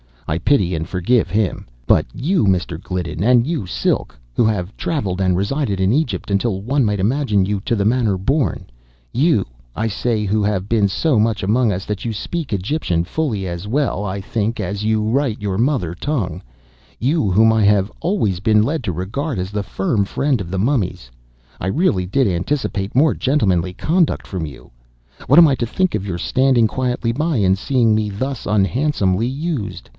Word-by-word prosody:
I 75 - 0
pity 95 -4 +2
and 80 +1 -3
forgive 95 +7 +1
him. 105 -2 -1 0.2
But - - +3
you, 170 - +1
Mr. 90 -3 0
Gliddon—and 90 +8 +1
you, 150 - -2
Silk—who - - -1
have 100 -3 -1
travelled 100 - -2
and 95 -2 +2
resided 100 +1 -1
in 95 +1 +3
Egypt 130 -6 -1
until 100 -1 0
one 130 +4 +1
might 105 -2 0
imagine 110 -3 +1
you 100 0 -1
to 120 - +1
the 100 - 0
manor 110 -3 +2
born—you, 95 - -1 0.3
I 110 - -1
say 110 +1 -1
who 105 +1 +1
have 100 -1 -1
been 110 -3 +3
so 125 +5 +1
much 110 -2 +1
among 110 +2 +2
us 90 +1 -4
that 105 +1 -4
you 115 - -2
speak 155 +4 -4
Egyptian 95 - -1
fully 110 - -2
as 85 +2 -5
well, 120 -5 0
I 100 0 -3
think, 110 +3 -2
as 100 +2 -3
you 110 0 +1
write 115 0 0
your 100 -2 -2
mother 120 - 0
tongue—you, 90 - -3
whom 110 +4 +5
I 110 -1 +2
have 100 0 +3
always 150 - 0
been 105 +1 +3
led 140 +1 -2
to 90 - -1
regard 110 - -3
as 95 +1 -3
the 105 -1 -2
firm 100 +3 -1
friend 135 +4 0
of 90 -4 -5
the 95 - -3
mummies—I - - -4
really 100 - +1
did 135 +8 +2
anticipate 100 +1 -2
more 150 +4 +4
gentlemanly 95 - +1
conduct 165 - 0
from 90 -5 -4
you. 70 -4 -11 0.6
What 140 +6 +7
am 170 - +9
I 140 - +2
to 120 - -2
think 185 +10 0
of 100 - -2
your 90 -3 -3
standing 130 +4 +2
quietly 125 0 -1
by 150 +6 -1
and 95 -2 +3
seeing 115 0 +2
me 110 -1 0
thus 130 +6 -4
unhandsomely 105 0 +1
used? 140 -3 -4
105 Hz, 180 wpm, -19 LUFS, 95-130 Hz, 0.6 s, am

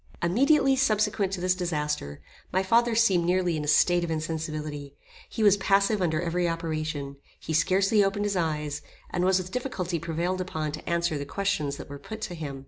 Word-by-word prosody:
Immediately 270 - +3
subsequent 215 -5 +1
to 185 - -3
this 185 0 +2
disaster, 150 - -3 0.3
my 190 +1 +1
father 230 +4 +3
seemed 195 -7 +4
nearly 180 -1 +1
in 150 - -3
a - - -5
state 175 +3 +4
of 170 - -3
insensibility. 155 -2 -4 0.3
He 225 - -2
was 205 -1 +6
passive 200 +1 +2
under 160 -3 +1
every 175 +1 0
operation. 155 -4 -3 0.2
He 160 - -5
scarcely 195 +6 +3
opened 200 +1 0
his 205 -1 -1
eyes, 150 -4 -2 0.3
and 175 - -1
was 185 0 +4
with 185 0 -4
difficulty 190 -9 -3
prevailed 170 +3 -2
upon 160 -4 -3
to 155 - -7
answer 170 -3 0
the 140 - -4
questions 150 -6 -1
that - - -9
were 140 0 -8
put 220 +7 -8
to 180 - -4
him. 145 -5 -6
175 Hz, 190 wpm, -27 LUFS, 155-195 Hz, 0.3 s, was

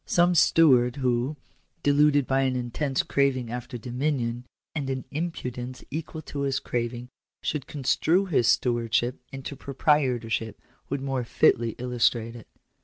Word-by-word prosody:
Some 175 +1 +4
steward 135 -7 +5
who, 130 +1 0 0.5
deluded 145 -1 +4
by 135 +1 +1
an 130 -1 +1
intense 130 +3 -1
craving 130 -4 0
after 120 0 -5
dominion, 125 0 -2 0.3
and 145 -4 -3
an 130 -1 -3
impudence 130 -6 -4
equal 155 +1 -5
to 145 - -6
his 135 -1 0
craving, 120 +1 -3 0.3
should 150 -4 -2
construe 160 +6 +1
his 140 -11 +2
stewardship 120 0 +1
into 135 +1 -6
proprietorship, 130 -6 0 0.3
would 140 0 -2
more 135 -2 -1
fitly 115 -1 +2
illustrate 120 -2 0
it. 115 - -11
130 Hz, 130 wpm, -26 LUFS, 120-145 Hz, 0.5 s, steward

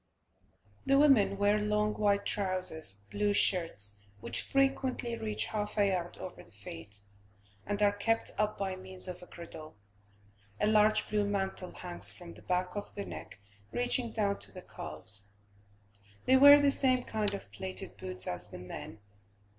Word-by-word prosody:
The 275 - +3
women 230 -10 +5
wear 205 +1 +3
long 210 0 +1
wide 200 -1 +1
trousers, 185 - +1 0.2
blue 205 0 +1
shirts, 105 - +2 0.2
which 115 +2 0
frequently 265 -3 0
reach 105 - -2
half 210 0 -3
a 205 - +4
yard 175 -2 -3
over 185 - -8
the - - -15
feet, 100 0 -9 0.7
and 205 0 -1
are 205 - +5
kept 225 +3 0
up 215 0 0
by 195 -1 -2
means 185 0 0
of 180 0 -6
a 180 - -12
girdle; 160 -4 -10 0.8
a - - +2
large 215 0 +4
blue 210 -1 +1
mantle 190 -2 -2
hangs 175 -1 -1
from 175 -1 -9
the - - -15
back 180 +1 -1
of 205 - -6
the 200 - -4
neck, - - -9 0.3
reaching 245 -1 0
down 200 -3 0
to - - -2
the 185 -2 -10
calves. 105 -2 -7 1.0
They 260 - +5
wear 285 +2 +9
the 285 -1 +4
same 255 -2 +2
kind 215 -2 +1
of 100 - -10
plated 95 -2 -6
boots 90 0 -2
as 90 0 -4
the - - -10
men. 95 +3 -9
200 Hz, 160 wpm, -31 LUFS, 170-215 Hz, 1.0 s, wear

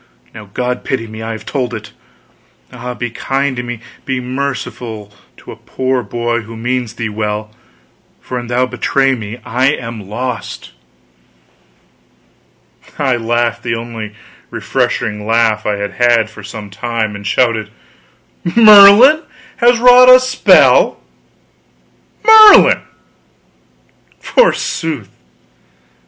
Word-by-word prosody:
Now 105 -3 -12
God 125 +3 -4
pity 130 -4 -3
me, 110 0 -10
I 115 0 -5
have 110 - -10
told 125 -4 -3
it! 105 -1 -10 0.8
Ah, 125 0 -7
be 120 -1 -5
kind 135 +2 -2
to 120 - -4
me, 120 -2 -7 0.2
be 135 -3 -3
merciful 125 -5 -6 0.2
to - - -13
a - - -10
poor 130 -1 -3
boy 120 +1 -3
who 115 +1 -11
means 120 0 -3
thee 115 - -4
well; 105 0 -4 0.7
for 125 - -6
an 120 - -9
thou 120 +1 0
betray 135 +2 0
me 110 -1 -7
I 125 +2 0
am 115 -7 -8
lost!" 125 +1 -6 2.3
I 135 -3 0
laughed 120 0 -2
the 120 -1 -3
only 115 0 -7
really 105 0 -13 0.3
refreshing 105 0 -3
laugh 115 -2 +1
I 105 - 0
had 100 0 -5
had 120 -3 +1
for 105 - -13
some 105 0 -10
time; 110 0 -4
and 100 0 -8
shouted: 110 -2 0 0.9
"Merlin 220 +6 +7 0.4
has 240 -1 +3
wrought 250 +1 +6
a 255 0 +9
spell! 260 - +3 1.3
Merlin, 435 -1 +7 1.4
forsooth! 160 - -1
120 Hz, 120 wpm, -14 LUFS, 110-135 Hz, 2.3 s, a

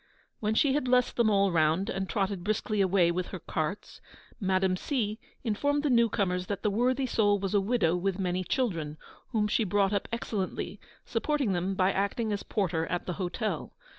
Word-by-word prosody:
When 215 0 0
she 270 +3 +3
had 290 -2 0
blessed 250 0 +2
them 235 -2 +3
all 200 -2 +3
round, 165 +4 +2
and 190 -3 -3
trotted 195 -3 -1
briskly 215 0 0
away 185 -2 +3
with 180 +1 -2
her 185 - -6
carts, 160 +2 -4 0.4
Madame 190 -2 +2
C. 220 -1 -2 0.2
informed 285 +6 0
the 295 - +2
new 235 -1 +4
comers 180 -4 -1
that 200 -3 -4
the 210 - +2
worthy 250 +5 +1
soul 205 -4 +2
was 195 0 -3
a 205 - +4
widow 195 -5 +2
with 185 +1 -1
many 185 -1 -1
children, 170 - -1 0.3
whom 215 -4 0
she 215 +2 +1
brought 200 0 +2
up 200 - -1
excellently, 205 -3 -3 0.3
supporting 250 -1 0
them 185 +2 -1
by 190 0 +3
acting 205 +3 -1
as 200 - -2
porter 165 -6 -1
at 175 - -2
the 180 - -2
hotel. 200 +5 -3
200 Hz, 190 wpm, -29 LUFS, 185-225 Hz, 0.4 s, new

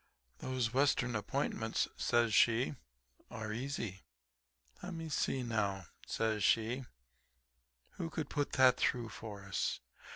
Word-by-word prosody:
"'Those 125 -3 -1
western 130 -3 +2
appointments,' 110 +1 -1
says 120 -2 +2
she, 120 +6 +4 0.6
'are 110 -1 -4
easy. 115 -6 -3 0.8
Le'me 165 -3 -5
see, 135 -2 0
now,' 100 -5 -1 0.2
says 110 -2 0
she, 115 +5 +2 1.1
'who 165 - -4
could 160 -2 -3
put 145 -2 -2
that 130 -1 +6
through 120 -2 +1
for 105 -2 -8
us. 95 -1 -1
120 Hz, 110 wpm, -35 LUFS, 110-135 Hz, 1.1 s, that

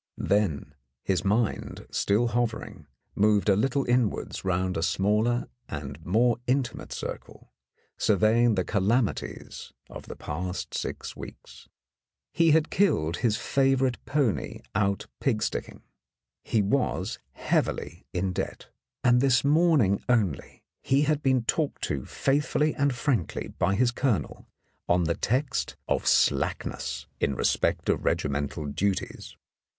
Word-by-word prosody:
Then 90 -9 0 0.3
his 95 -1 0
mind, 105 +2 -1
still 110 +4 +2
hovering, 115 -9 -3 0.3
moved 105 0 +3
a 100 - +5
little 135 +6 +1
inwards 120 -3 0
round 95 0 0
a 80 - -1
smaller 105 +7 +1 0.2
and 70 +1 -6
more 115 +7 +2
intimate 130 0 -1
circle, - - -7 0.5
surveying 110 +3 +3
the 90 - +1
calamities 105 +4 -1 0.2
of - - -9
the - - -7
past 90 +5 -5
six - - -4
weeks. - - -11 0.6
He 165 -1 +4
had 160 0 +3
killed 85 - +2
his 110 -1 +1
favourite 135 -2 +1
pony 140 -7 -1
out 100 -1 0
pig 115 -6 0
sticking, - - -4 0.6
he 110 -3 +1
was 125 +7 0
heavily - - -2
in 90 +1 -1
debt, - - -5 0.3
and 125 0 +5
this 130 -3 +3
morning 145 - +3
only 105 - 0 0.2
he 140 +2 +2
had 150 0 +1
been 130 -4 +2
talked 150 +5 -1
to 70 -3 -2
faithfully 150 +2 +1
and 140 -2 +1
frankly 125 - -1
by 95 +2 0
his 120 +3 +3
colonel 120 -4 -1 0.4
on 90 0 +3
the 85 +1 +1
text 130 - -1
of - - 0
slackness 65 - +1
in 70 - 0
respect - - +1
of - - +1
regimental 70 +1 -1
duties. 95 +7 -3
110 Hz, 125 wpm, -27 LUFS, 95-130 Hz, 0.6 s, a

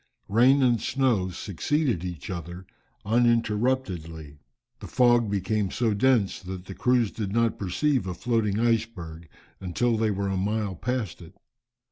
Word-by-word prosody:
Rain 130 +6 +5
and 120 -4 +3
snow 120 -9 +1
succeeded 105 - -1
each 90 -2 -6
other 85 +1 -7 0.4
uninterruptedly. 105 - 0 0.4
The - - -8
fog 120 -1 +4
soon - - -5
became 100 +1 -1
so 115 +2 0
dense, 110 -2 +2
that 95 -1 -7
the 95 - -8
crews 125 0 +1
did 105 -4 -4
not 115 +1 +1
perceive 120 +5 0
a 90 - -4
floating 110 -1 0
iceberg, 110 -9 -2 0.3
until 110 +6 0
they 110 0 +1
were 100 -1 -1
a 95 - -1
mile 105 +1 -1
past 125 0 -3
it. 85 0 -14
105 Hz, 145 wpm, -26 LUFS, 95-120 Hz, 0.4 s, Rain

